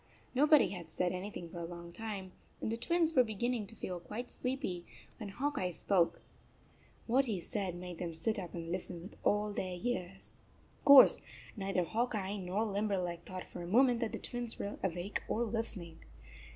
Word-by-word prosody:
Nobody 290 - +6
had 175 -4 -7
said 180 +2 0
anything 185 -1 -5
for 175 - -6
a - - -4
long 170 0 -7
time, 205 -4 -5 0.3
and - - -2
the - - +1
Twins 330 +7 +2
39 - - -13
were 255 - +8
beginning 220 +1 -1
to 225 - -9
feel 180 -4 -4
quite 215 +8 -6
sleepy, 250 -9 -2 0.4
when 215 -3 -5
Hawk 280 +9 -1
Eye 180 - 0
spoke. 175 0 +1 0.8
What 260 +4 +4
he 215 -7 -1
said 185 0 -3
made 175 -1 -7
them 170 -2 -2
sit 215 +7 -1
up 180 -3 -6
and 165 -1 -5
listen 175 -1 -4
with 195 - -10
all 210 0 +2
their 185 -2 -3
ears. 195 -4 -4 0.4
Of - - -29
course 280 -2 +10 0.3
neither 195 -3 0
Hawk 230 +6 0
Eye 200 0 -2
nor 195 +3 -1
Limberleg 195 -5 -1
thought 185 0 -6
for 175 - -8
a 170 - -5
moment 245 +4 +5
that 230 -3 -1
the 225 - -3
Twins 240 -1 -3
were 200 - -4
awake 180 +2 -1
or 235 - +1
listening. 210 -7 -3
200 Hz, 190 wpm, -34 LUFS, 180-230 Hz, 0.8 s, course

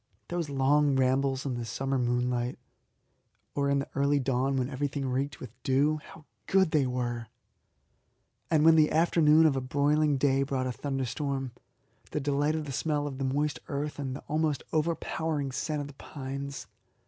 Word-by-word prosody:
Those 175 -3 -2
long 140 +1 +3
rambles 135 +1 +1
in 135 - -1
the 120 -1 -3
summer 135 +4 -2
moonlight, 125 0 0 1.0
or 140 -1 0
in 140 - +3
the 140 - -3
early 140 +1 +2
dawn 135 +1 0
when 125 -1 0
everything 140 +1 -2
reeked 135 +3 -2
with 125 - -8
dew, 145 +3 +2
how 155 - -14 0.2
good 190 -4 +3
they 145 -4 +3
were! 120 -2 -2 1.2
And 155 -2 +3
when 165 0 +8
the 155 -1 +4
afternoon 160 -1 +5
of 150 -3 +4
a 135 - 0
broiling 145 +2 +2
day 135 0 +2
brought 135 -1 -1
a 130 - -1
thunderstorm, 135 0 -3 0.6
the - - -2
delight 145 +2 +1
of 155 -1 -3
the 140 - -5
smell 145 +2 -1
of 140 -2 -5
the - - -1
moist 145 +3 0
earth 145 +1 -3
and 135 -2 -3
the - - -7
almost 155 -2 0
overpowering 155 -2 -1
scent 150 +3 -2
of 145 - -5
the 145 - -11
pines! 140 -1 -6
140 Hz, 170 wpm, -29 LUFS, 130-150 Hz, 1.2 s, when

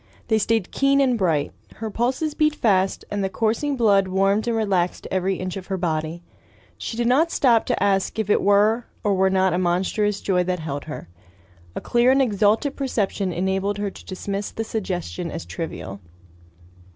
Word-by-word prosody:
They 220 -1 +3
stayed 225 -2 0
keen 275 0 +2
and 260 -3 +3
bright. 165 -9 0 0.2
Her 220 -1 -5
pulses 260 +8 -1
beat 305 0 +2
fast, 195 -6 +1
and 205 -1 -1
the 190 - 0
coursing 230 +8 -1
blood 200 -5 +4
warmed 195 +4 +1
and 230 -1 +1
relaxed 190 -5 0
every 190 +1 0
inch 185 +1 -4
of 190 - -8
her 190 - -2
body. 165 -1 -2 0.5
She 225 - -6
did 240 - 0
not 280 +8 +3
stop 240 -8 +3
to - - 0
ask 195 +1 +1
if 220 -2 -1
it 205 - +3
were 210 +4 +3 0.2
or 205 - +2
were 190 0 +3
not 190 -1 +2
a 175 - +1
monstrous 190 +3 0
joy 180 -2 +1
that 180 0 -1
held 145 -3 -5
her. 150 - -7 0.7
A - - -4
clear 240 +1 +3
and 265 +1 +4
exalted 220 +3 +2
perception 210 -8 -1
enabled 190 +3 -1
her 205 -1 -2
to - - -14
dismiss 200 +2 -4
the 225 - -4
suggestion 185 -5 -4
as 165 - -6
trivial. 100 - -6
200 Hz, 185 wpm, -23 LUFS, 185-225 Hz, 0.7 s, blood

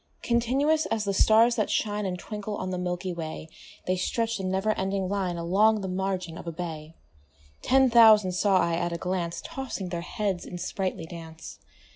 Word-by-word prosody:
Continuous 270 +7 +1
as 225 -2 -1
the 200 - 0
stars 225 +4 +5
that 215 - 0
shine 210 -1 -1
And 180 -1 -3
twinkle 210 +2 -6
on 185 - -4
the 180 - -3
milky 180 0 -3
way, 160 -1 -6 0.4
They 185 - +1
stretch'd 225 +4 -1
in 185 -1 -2
never 190 +3 +1
ending 195 -1 -1
line 185 -3 -2
Along 205 +6 +3
the 190 - -4
margin 185 -2 -3
of - - -10
a - - -2
bay: 160 -1 -7 0.7
Ten 265 0 +4
thousand 220 -5 +6
saw 190 +2 +2
I 170 -2 +1
at 175 +1 -1
a 170 - -2
glance 180 -1 -3
Tossing 250 -8 -5
their 170 -1 -3
heads 195 0 -2
in 180 - -7
sprightly 180 -1 -3
dance. 160 -1 -10
190 Hz, 185 wpm, -27 LUFS, 175-215 Hz, 0.7 s, thousand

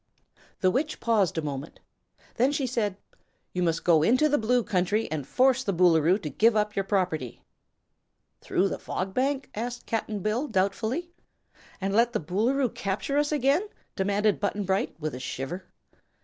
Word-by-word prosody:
The 185 -2 +4
Witch 295 +7 -1
paused 210 -8 +1
a 160 - -1
moment. 145 0 -5 0.5
Then 255 +4 +2
she 285 -2 -1
said: 215 -6 -1 0.6
"You 180 - -1
must 165 -2 0
go 165 -3 +5
into 255 - +4
the 295 - +2
Blue 240 +2 +2
Country 205 +4 0
and 150 -4 -3
force 260 0 +3
the 200 -5 -1
Boolooroo 170 0 +4
to 150 - -3
give 225 +1 +3
up 210 -1 0
your 195 - 0
property." 180 - -1 1.0
"Through 195 +2 0
the - - -4
Fog 190 +1 -4
Bank?" 270 +3 -1
asked 240 +3 -5
Cap'n 220 -2 -2
Bill, 220 +9 -1
doubtfully. 220 - -1 0.7
"And 195 0 -2
let 235 +3 +3
the - - +1
Boolooroo 230 - +1
capture 205 +9 -1
us 295 0 0
again?" 285 +3 +3 0.3
demanded 200 +2 +1
Button 205 0 -1
Bright, 195 +1 -1
with 155 -1 -3
a 125 - -6
shiver. 135 +8 -5
210 Hz, 165 wpm, -27 LUFS, 180-245 Hz, 1.0 s, go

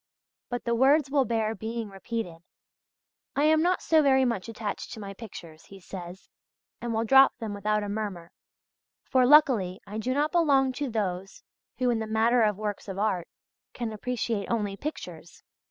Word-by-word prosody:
But 245 -2 -4
the 235 - +1
words 270 +4 +4
will 275 -2 +3
bear 220 -1 0
being 225 0 -5
repeated: 195 -3 -5 1.0
"I 285 - +2
am 310 +1 +4
not 360 +2 +1
so 320 -1 +4
very 265 -2 +4
much 230 -4 -2
attached 220 -2 -5
to 225 - -8
my 200 -1 -7
pictures," 175 -7 -11
he 195 - -13
says, 180 0 -9 0.5
"and 240 0 -3
will 225 0 0
drop 270 +4 +6
them 225 -4 -5
without 210 +1 0
a - - -4
murmur; 200 -5 -4 0.7
for, 255 -1 +3
luckily, 245 -11 +5
I 210 +2 -6
do 255 +4 -1
not 300 +2 +1
belong 280 -6 +3
to 270 +2 -3
those 195 -4 -3 0.3
who, 250 0 +2
in 230 - 0
the 220 - -4
matter 225 +3 +3
of 210 -3 +2
works 210 -1 -4
of 195 -1 -6
art, 195 -4 0 0.5
can 235 -2 -4
appreciate 225 -2 -3
only 210 -4 -1
pictures. 300 +9 -8
225 Hz, 175 wpm, -27 LUFS, 205-260 Hz, 1.0 s, drop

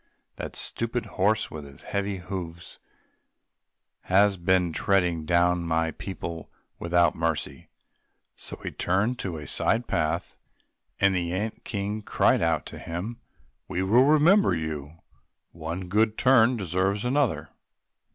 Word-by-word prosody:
That - - -6
stupid 115 +1 -3
horse, 105 +3 0
with 75 -1 -7
his 70 -1 -14
heavy 100 -1 -2
hoofs, 90 -2 -7 1.3
has 100 +2 +4
been 90 -1 +1
treading 90 -4 +1
down 85 0 +3
my 80 0 0
people 85 -2 -7 0.3
without 85 -1 +3
mercy!" 80 -4 -3 0.7
So - - -9
he - - -4
turned 100 +6 +1
on - - -4
to 90 -8 -4
a 75 - -7
side 115 +9 +1
path 80 -6 -1 0.6
and 100 -1 +4
the 85 -2 -1
ant 105 +5 -3
king 105 0 -3
cried - - +2
out 80 -2 +1
to - - -9
him, 95 +9 -5 0.5
"We 90 - -2
will 115 +7 +5
remember 155 - +5
you—one 80 +2 -7
good 110 +3 +2
turn 125 -2 +5
deserves 95 +2 -1
another!" 135 +1 0
95 Hz, 130 wpm, -26 LUFS, 85-105 Hz, 1.3 s, will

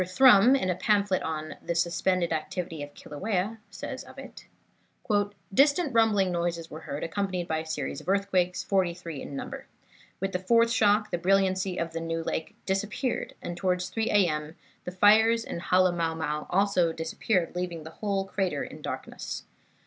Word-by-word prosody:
Thrum, 230 +5 +6
in 185 -9 +1
a - - -1
pamphlet 200 -1 +2
on 155 -1 -4
"The 170 - -3
Suspended 170 +1 +1
Activity 165 0 -4
of 145 0 -8
Kilauea," 200 +6 -3
says - - -6
of - - -15
it: - - -11 1.1
"Distant 285 - +4
rumbling 210 -5 +3
noises 170 -1 -2
were 155 - -7
heard, 145 - -3
accompanied 185 0 -2
by 160 -1 0
a 160 - -6
series 145 -3 -3
of 175 - -7
earthquakes, 190 -2 +1
forty 185 -3 +1
three 165 -6 -7
in 140 - -7
number. - - -6 0.5
With 195 +1 -2
the 180 - -1
fourth 230 +5 +3
shock 210 -2 +3
the 175 - -1
brilliancy 190 0 +2
of 170 -1 -3
New 165 0 -3
Lake 160 - -3
disappeared, 210 +6 -2
and 175 - -4
towards 180 0 -1
3 225 +3 -1
A. 200 -3 +4
M. 150 0 -3 0.3
the 180 - -4
fires 220 +4 +5
in - - -5
Halemaumau 165 -4 +1 0.5
disappeared 165 +3 0
also, 180 - -5
leaving 175 -3 -4
the 160 - -9
whole 200 -2 0
crater 185 -7 -1
in - - -9
darkness. - - -5
180 Hz, 165 wpm, -28 LUFS, 165-200 Hz, 1.1 s, Thrum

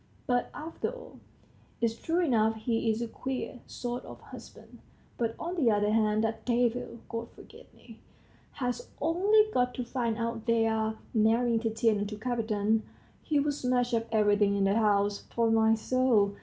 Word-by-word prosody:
But, 245 -1 0
after 320 +2 -4
all, - - -11 0.6
it's 230 -1 +1
true 330 +8 -1
enough; 225 -5 +2
he's 225 0 0
a - - -3
queer 260 +1 -5
sort 245 0 -5
of - - -11
husband. - - -13 0.4
But 230 -1 -1
on 345 +2 -4
the 265 -8 +3
other 210 -1 +2
hand, 215 0 +2
that 225 0 -2
devil, 240 -1 0
God 230 0 -5
forgive - - -15
me, - - -16 0.5
has 245 -3 -3
only 390 +7 +4
got 250 0 +1
to 250 - -3
find 235 -2 -2
out 230 0 -3
they're 220 -1 +1 0.2
marrying 230 +1 +3
Tatiana 225 -2 +1
to 210 +1 -5
Kapiton, 220 -2 0 0.4
he'll 295 -1 +1
smash 250 -3 0
up 230 0 0
everything 205 -2 +3
in 200 - +1
the 195 0 +3
house, 205 -2 +2
'pon 230 -1 +1
my 225 0 +4
soul! 225 -3 +2
230 Hz, 155 wpm, -29 LUFS, 220-250 Hz, 0.6 s, only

